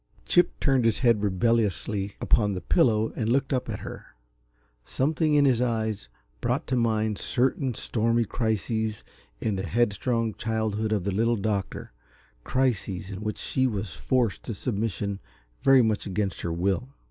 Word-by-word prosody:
Chip 175 - +3
turned 135 -3 +3
his 115 -2 +2
head 115 -3 +4
rebelliously 105 -1 0
upon 105 -3 +2
the 90 - -3
pillow 110 -2 +2
and 115 -2 -1
looked 135 +2 +1
up 125 - -1
at - - -4
her. - - -8 0.8
Something 150 - +1
in 145 -1 +5
his 125 -3 +3
eyes 110 - -1 0.3
brought - - 0
to 130 - -1
mind 110 -3 +1
certain 130 0 0
stormy 115 +2 0
crises 110 0 -1 0.4
in 105 -3 -1
the 95 +1 -3
headstrong 115 0 0
childhood 110 0 -2
of 105 -4 +1
the 100 - -1
Little 115 +4 +2
Doctor 100 - -3 0.5
crises 105 - -1
in 95 +1 -6
which 105 0 -3
she 130 0 0
was 100 -6 -3
forced 125 -6 0
to 115 - -4
submission 100 -2 -2 0.4
very 135 -2 +6
much 110 -2 0
against 100 0 -2
her 85 - -2
will. 95 +7 -1
110 Hz, 155 wpm, -26 LUFS, 100-120 Hz, 0.8 s, very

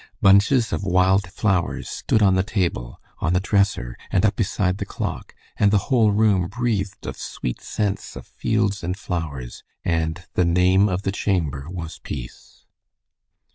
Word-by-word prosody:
Bunches 100 +5 +4
of - - -2
wild 95 0 +2
flowers 95 -4 0
stood 110 - 0
on 95 -2 +5
the 95 - +3
table, 90 - -2 0.2
on 85 - 0
the 90 - +3
dresser, 100 - +1
and 95 - +2
up 105 - +2
beside 95 -2 0
the - - -1
clock, - - -5 0.2
and 100 - +4
the 105 - +4
whole 115 -5 +5
room 100 -4 +3
breathed 105 -3 -2
of - - -5
sweet - - -5
scents 100 -2 -3
of - - -8
fields 105 -3 -1
and 90 +2 -2
flowers, 75 -11 -5 0.2
and 80 +1 -1
"the 90 - +2
name 90 +4 +4
of 90 +1 -2
the 95 - 0
chamber 80 -9 -1
was 85 -3 -6
peace." 60 -4 -9
95 Hz, 160 wpm, -23 LUFS, 85-100 Hz, 0.2 s, on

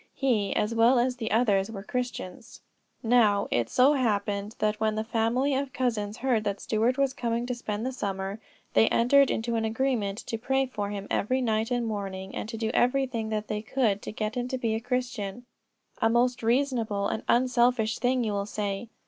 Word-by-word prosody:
He, 225 -8 +1
as 210 +2 0
well 230 +3 +5
as 250 +1 +1
the 225 -2 -3
others, 210 -3 +2
were 200 -3 -7
Christians. 245 -4 -5 0.4
Now, 225 -4 +3
it 115 -1 +1
so 265 +4 +5
happened 205 -4 -1
that 210 0 0
when 215 0 +1
the 215 - -1
family 235 +5 +1
of 270 -1 -2
cousins 220 -5 -1
heard 245 -4 +1
that 200 -1 -2
Stuart 230 +4 0
was 275 -1 +1
coming 235 -1 -2
to 250 - -2
spend 220 -2 -4
the 260 - -1
summer, 195 -4 -4 0.3
they 225 - +5
entered 275 +4 +4
into 230 +1 -1
an 225 - 0
agreement 220 -3 -1
to 225 - -4
pray 265 +3 +1
for 205 -6 -4
him 200 -1 -5
every 255 +5 +1
night 225 -3 0
and 245 -1 0
morning, 195 -3 -4
and 215 - -5
to 225 - -5
do 220 0 -1
every 270 +2 +3
thing 230 -4 -4
that 215 -1 -2
they 210 0 -2
could 220 -3 0
to - - -6
get 215 0 -3
him 245 0 -2
to 260 - -2
be 230 -3 -1
a 220 - -1
Christian. 245 -2 -3 0.6
A 225 - +4
most 245 +2 +2
reasonable 230 -4 +1
and 220 - -2
unselfish 240 -2 +2
thing, 250 0 +1
you 220 - -1
will 200 0 -2
say. 205 +1 -3
225 Hz, 200 wpm, -27 LUFS, 210-250 Hz, 0.6 s, well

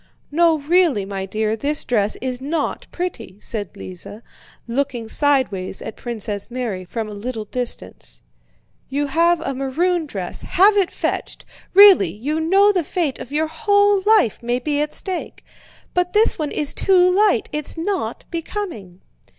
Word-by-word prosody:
"No 330 +1 +4
really, 300 - +2
my 195 -1 -5
dear, 215 +2 -1
this 285 +6 -1
dress 210 -4 0
is 255 -1 -3
not 295 +2 -2
pretty," 330 - -5
said 210 -4 -5
Lise, 95 -2 -8 0.6
looking 245 -2 -2
sideways 245 -10 0
at - - -7
Princess 215 -4 -5
Mary 235 -7 -4
from 220 +4 -5
a 210 - -8
little 220 +1 -5
distance. 245 +3 -4 0.7
"You 285 +2 -1
have 335 +4 +2
a 275 - -3
maroon 315 +6 0
dress, 190 -9 -4
have 400 +3 +4
it 390 -3 +3
fetched. - - -4 0.3
Really! 390 - +8
You 265 - -3
know 390 +6 +4
the 365 -4 0
fate 310 -3 -2
of 260 - -9
your 305 +2 +1
whole 405 +4 +2
life 430 - +4
may 240 +1 0
be 290 +3 -1
at 300 - -2
stake. 375 -3 -5 0.5
But 360 0 0
this 430 -3 +4
one 300 -2 -1
is 295 -2 -1
too 365 -2 +4
light, 415 +3 +3
it's 300 +2 -5
not 375 +4 -3
becoming!" 330 - -5
285 Hz, 155 wpm, -20 LUFS, 225-355 Hz, 0.7 s, Really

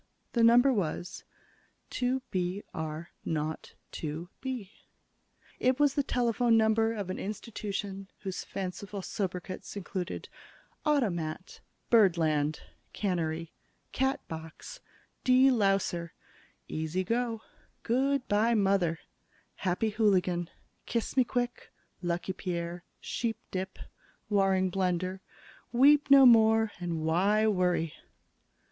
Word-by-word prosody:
The 235 - +2
number 245 +4 +6
was: 180 -3 -3 0.7
"2 255 +1 0
B 185 +2 -1
R 160 +1 -5
0 155 0 -1 0.4
2 160 +3 -5
B." 250 -7 -4 0.9
It 255 +1 +2
was 290 -2 +4
the 285 - +2
telephone 240 -3 +2
number 225 0 +3
of 200 -5 -4
an - - -5
institution 200 -2 -5
whose 190 -2 -4
fanciful 195 +1 -5
sobriquets 185 -1 -4
included: 185 -1 -4 0.6
"Automat," 185 - -1 0.3
"Birdland," 160 -8 +3 0.3
"Cannery," 165 -4 -2 0.4
"Catbox," 255 - -3 0.4
"De 260 +1 +6
louser," 195 -6 +1 0.5
"Easy 160 +4 -2
go," 230 +2 -1 0.4
"Good 265 +3 +1
by, 220 +3 +3
Mother," 195 -5 +2 0.6
"Happy 190 +4 0
Hooligan," 185 -5 +2 0.4
"Kiss 235 0 -2
me 260 - +5
quick," 245 0 -3 0.3
"Lucky 175 +1 -2
Pierre," 175 -1 -4 0.2
"Sheepdip," 220 -5 -4 0.5
"Waring 190 -2 +3
Blendor," 185 0 -1 0.5
"Weep 285 +4 +5
no 275 -1 +9
more" 225 -2 +6
and 170 -3 -3
"Why 195 +7 +3
Worry?" 180 -6 +1
195 Hz, 100 wpm, -30 LUFS, 175-230 Hz, 0.9 s, no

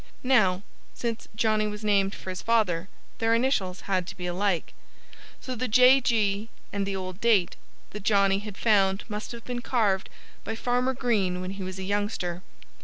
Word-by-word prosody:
Now, 205 -8 +3 0.3
since 230 -1 -4
Johnnie 215 -1 +2
was 210 +1 -6
named 200 -2 +2
for 185 - -6
his 185 - -6
father, 200 -6 +1 0.3
their 225 0 +3
initials 220 -7 0
had 185 -3 -1
to - - -8
be 180 - -5
alike. 180 0 -1 0.7
So 255 - -5
the 255 +1 -2
J. 255 +4 +6
G. 215 -2 +1 0.2
and 200 -1 -1
the 195 - -2
old 185 0 -6
date 210 -7 +3 0.4
that 210 - -7
Johnnie 200 -1 +3
had 205 -1 -8
found 195 -3 +3
must 210 -1 -5
have 235 -1 -9
been 245 -1 -4
carved 210 -7 +1 0.3
by 225 - -4
Farmer 250 +3 0
Green 205 -8 0
when 185 +1 -4
he 195 0 -7
was 185 0 -6
a 190 - -5
youngster. 195 -3 -2
205 Hz, 180 wpm, -27 LUFS, 190-230 Hz, 0.7 s, J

